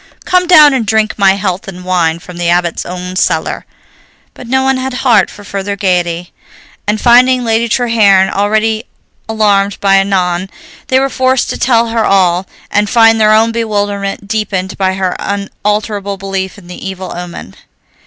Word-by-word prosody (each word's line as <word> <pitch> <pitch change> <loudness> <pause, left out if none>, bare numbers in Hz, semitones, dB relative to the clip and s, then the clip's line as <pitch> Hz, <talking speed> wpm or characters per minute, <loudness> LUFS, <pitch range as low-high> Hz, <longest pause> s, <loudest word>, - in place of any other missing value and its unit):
Come 365 0 +2
down 305 -5 +7
and 260 -3 0
drink 220 0 0
my 195 -1 +5
health 195 -1 -3
in 180 -1 -9
wine 175 -3 0
from 175 +1 -12
the 175 -1 -1
Abbot's 175 -1 0
own 180 +1 -6
cellar." 165 -3 -1 0.7
But 250 - -11
no 265 +2 +1
one 265 0 +1
had 260 0 -4
heart 220 -7 +4
for 205 - -13
further 200 0 -4
gaiety, 175 -3 -1 0.5
and, 210 +1 0
finding 250 +2 +4
Lady 230 0 0
Treherne 210 -6 +3
already 215 +3 0 0.4
alarmed 205 -2 +1
by 195 -1 +3
Annon, 190 -2 0 0.4
they 260 - +3
were 270 - +1
forced 260 -1 0
to - - -4
tell 235 -2 +2
her 225 -1 0
all, 185 -2 +2 0.2
and 205 0 +1
find 225 -1 +4
their 215 0 +5
own 225 +1 +3
bewilderment 205 -3 -3
deepened 200 -3 -3
by 190 -1 0
her 190 -1 -2
unalterable 205 0 -3
belief 195 0 -4
in 200 - -15
the 180 0 -10
evil 190 -1 -6
omen. 175 - -8
200 Hz, 165 wpm, -12 LUFS, 185-225 Hz, 0.7 s, down